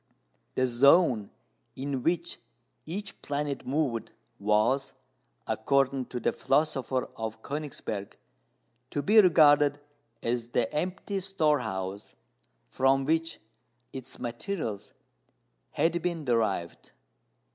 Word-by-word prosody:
The 130 - +2
zone 130 - +4 0.5
in 135 0 -3
which 170 +4 -1 0.5
each 200 +5 -6
planet 145 -1 -3
moved 135 -4 -1 0.3
was, 105 +7 +2 0.5
according 135 +2 +1
to 125 - -4
the - - +1
philosopher 135 -3 0
of 110 0 -5
Königsberg, 140 -9 -5 0.8
to 145 - -2
be 215 +2 +7
regarded 145 -5 +5 0.4
as 120 0 -1
the 120 -1 -1
empty 185 +5 -2
storehouse 140 - -1 0.5
from 135 +1 +2
which 165 +2 0 0.5
its 130 -1 -8
materials 120 - -4 0.8
had 170 +1 +1
been 170 -3 -2
derived. 110 -8 -1
135 Hz, 95 wpm, -28 LUFS, 120-160 Hz, 0.8 s, be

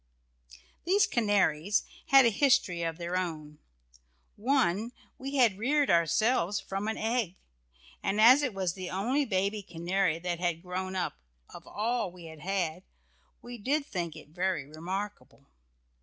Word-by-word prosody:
These 395 +5 +4
canaries 205 -4 +1 0.2
had 270 -2 +7
a 230 - +4
history 200 -8 +2
of 165 -1 -2
their 175 +1 -4
own. 155 -5 -4 0.8
One, 235 -2 +1 0.3
we 275 +2 -5
had 230 -7 +3
reared 285 +5 +2
ourselves 175 +4 +2
from 195 +2 -4
an 220 - -2
egg, 225 -5 -1 0.7
and 205 - -1
as 250 +6 +8
it 255 -8 -2
was 185 -3 -1
the 185 -1 -6
only 250 +10 0
baby 200 -1 0
canary 175 -1 -1
that 175 0 -3
had 175 -1 -1
grown 185 +1 -4
up 180 - -2 0.3
of - - -12
all 225 -2 -1
we 175 -1 -13
had 160 -1 -10
had, 180 -1 -2 0.6
we 240 0 -8
did 280 +7 0
think 170 - -4
it 155 -2 -12
very 180 -3 -1
remarkable. 160 -3 -6
190 Hz, 145 wpm, -29 LUFS, 170-230 Hz, 0.8 s, as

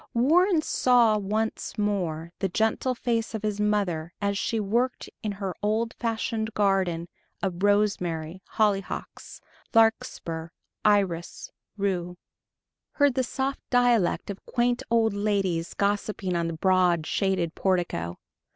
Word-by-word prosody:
Warren 325 - +4
saw 235 -7 +4
once 215 +3 -2
more 175 -6 -1
the 195 - 0
gentle 220 +6 0
face 230 -2 -1
of 215 - -5
his 210 -1 -1
mother, 190 -6 0
as 200 -1 0
she 220 +3 -1
worked 235 +5 0
in 210 -2 -2
her 195 -2 -4
old 220 +2 0
fashioned 225 -1 -2
garden 190 -5 +1 0.4
of 185 -2 -2
rosemary, 190 -5 +1 0.2
hollyhocks, 200 -3 -1 0.3
larkspur, 175 -7 +1 0.4
iris, 195 -5 +1 0.3
rue,... 180 -3 -2 0.8
heard 285 -2 +3
the 260 - +1
soft 265 +2 -2
dialect 240 -7 +2
of 195 - -10
quaint 245 0 +1
old 225 -2 +3
ladies 195 -5 -1
gossiping 200 -2 -1
on 170 -1 0
the 165 - -3
broad, 180 -1 +2
shaded 185 -4 0
portico 170 - -1
205 Hz, 125 wpm, -26 LUFS, 180-225 Hz, 0.8 s, Warren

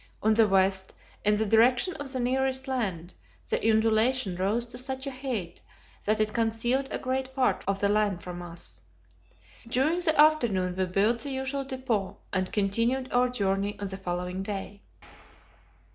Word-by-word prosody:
On 220 +1 +4
the 220 0 +5
west, 190 -1 +1 0.3
in 210 0 +3
the 220 +1 +1
direction 240 - +4
of 285 -2 -5
the 260 - -3
nearest 265 +2 0
land, 190 -10 -2 0.3
the 225 - +1
undulation 220 -1 +3
rose 205 +6 0
to 240 +1 -6
such 265 +1 -3
a 275 - -3
height 255 -10 -4 0.4
that 215 +1 +2
it 215 0 +1
concealed 235 +4 0
a - - -1
great 260 0 -3
part 260 -2 +1
of 195 0 -1
the 200 - +3
land 205 -3 +1
from 175 -1 -7
us. 175 -1 -6 0.9
During 270 +9 +1
the 315 -4 +2
afternoon 235 -13 +4
we 190 0 0
built 200 +6 +1
the 280 - -2
usual 265 +1 -2
depot, 255 -7 -2 0.2
and 185 -1 -1
continued 230 +6 0
our 250 0 +3
journey 200 -3 -1
on 200 -1 -4
the 190 - -4
following 180 0 -3
day. 200 0 -5
225 Hz, 165 wpm, -28 LUFS, 195-260 Hz, 0.9 s, the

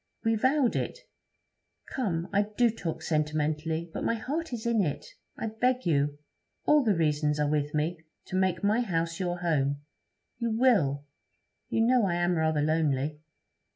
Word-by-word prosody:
We 225 - +3
vowed 260 +3 +2
it. - - -2 1.0
Come, 180 -10 -1
I 205 +1 +2
do 240 -2 +4
talk 170 -7 -5
sentimentally, 155 +1 -1
but - - -4
my 230 - +1
heart 300 +8 -3
is 235 -2 -5
in 235 -2 +2
it. 145 -5 -3 0.3
I - - -3
beg 250 +4 0
you 145 -2 +1 0.5
all 300 -1 +5
the 215 -5 +2
reasons 150 -2 +1
are 150 - +2
with 145 0 0
me 160 +3 0 0.3
to - - -6
make 185 -2 +1
my 210 +3 +3
house 165 -5 -1
your 175 -1 -2
home. 145 -4 0 0.6
You 230 -2 -1
will. 160 - +3 0.6
You 225 - +1
know 235 -2 +4
I 170 - 0
am 175 +1 +1
rather 160 -2 +1
lonely.' 150 -2 0
170 Hz, 160 wpm, -28 LUFS, 150-225 Hz, 1.0 s, all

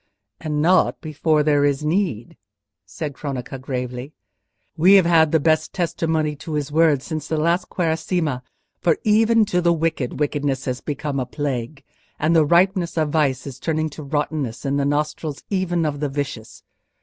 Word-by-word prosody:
"And 150 -1 -2
not 180 +3 +3
before 155 -1 +1
there 145 -1 +3
is 145 +1 +1
need," 155 - -1 0.5
said 145 +9 -5
Cronaca, 135 -2 -5
gravely. 125 +1 -5 0.6
"We 180 +5 +5
have 190 -3 +6
had 160 -2 +4
the 160 - +4
best 155 +1 +1
testimony 160 -3 -1
to 155 +2 -7
his 150 -1 -2
words 155 -3 +3
since 155 -3 -4
the 160 - -1
last 170 +4 +1
Quaresima; 160 -4 -1 0.4
for 170 -3 +2
even 220 +1 +4
to 180 -4 0
the 170 0 +3
wicked 160 -6 -2
wickedness 145 -2 -1
has 125 -1 -3
become 145 -1 -3
a 125 - -3
plague; 135 0 -4 0.3
and 160 +3 +1
the 160 - +6
ripeness 175 +1 +2
of 155 -2 +1
vice 140 -5 +1
is 135 -2 -8
turning 155 0 -1
to 155 - -9
rottenness 145 -4 -3
in 140 +1 0
the 140 - +1
nostrils 150 +1 -2
even 175 -4 0
of 145 -2 -2
the 145 -1 -1
vicious. 135 -5 -5
150 Hz, 170 wpm, -22 LUFS, 140-165 Hz, 0.6 s, have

